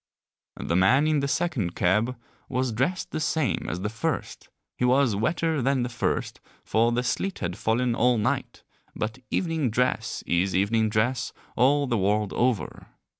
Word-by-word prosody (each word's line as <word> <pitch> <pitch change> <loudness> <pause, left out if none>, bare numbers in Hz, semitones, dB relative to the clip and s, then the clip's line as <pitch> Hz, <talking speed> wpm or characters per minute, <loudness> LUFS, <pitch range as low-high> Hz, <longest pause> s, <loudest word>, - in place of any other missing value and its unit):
The 85 - -1
man 115 - +4
in 155 -1 +2
the 140 - -1
second 135 - -1
cab 110 +7 +1 0.3
was 130 -1 0
dressed 130 +12 -1
the - - -2
same 155 -2 0
as 90 - -4
the 105 - -1
first, 155 +9 -4 0.3
he - - -3
was 125 -2 +3
wetter 155 +7 0
than 135 0 +1
the 120 - -2
first, 120 - -2 0.2
for 115 +2 +2
the 120 +1 0
sleet 185 +10 -2
had 90 0 -3
fallen 120 +3 0
all 120 +1 +3
night, 105 - -2 0.3
but 110 +3 -3
evening 165 -7 0
dress 115 -1 -1
is 90 +2 +1
evening 110 +3 +2
dress 120 +4 0 0.2
all 140 +4 +3
the 120 -5 0
world 105 +1 +1
over. 125 -4 -1
120 Hz, 165 wpm, -26 LUFS, 105-135 Hz, 0.3 s, man